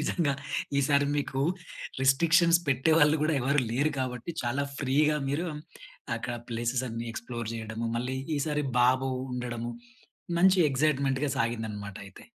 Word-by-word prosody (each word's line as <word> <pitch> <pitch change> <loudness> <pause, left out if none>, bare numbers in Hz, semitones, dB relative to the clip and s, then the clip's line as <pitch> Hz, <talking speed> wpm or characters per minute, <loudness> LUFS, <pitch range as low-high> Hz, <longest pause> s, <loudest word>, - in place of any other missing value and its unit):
నిజంగా 160 -6 +1 0.5
ఈసారి 140 +1 +3
మీకు 135 -2 -2 0.6
రిస్ట్రిక్షన్స్ 170 +5 +5
పెట్టేవాళ్ళు 150 +3 +4
కూడా 155 - +2
ఎవరు 140 +3 +2
లేరు 140 +6 +1
కాబట్టి 125 +2 -3
చాలా 130 +4 0 0.2
ఫ్రీగా 150 +3 +2
మీరు 155 +6 -1 0.7
అక్కడ 120 +1 -4
ప్లేసెస్ 120 +2 -1
అన్ని 115 0 -4
ఎక్స్‌ప్లోర్ 120 -1 -5
చేయడము. 110 +1 -4
మళ్ళీ 125 +2 -2 0.2
ఈసారి 150 0 0 0.2
బాబు 130 +2 +3 0.2
ఉండడము 120 -1 -4 0.7
మంచి 185 +1 +5
ఎక్సైట్‌మెంట్‌గా 140 0 +1
సాగిందన్నమాట 110 -4 -3
అయితే. 100 - -14
130 Hz, 120 wpm, -28 LUFS, 120-150 Hz, 0.7 s, రిస్ట్రిక్షన్స్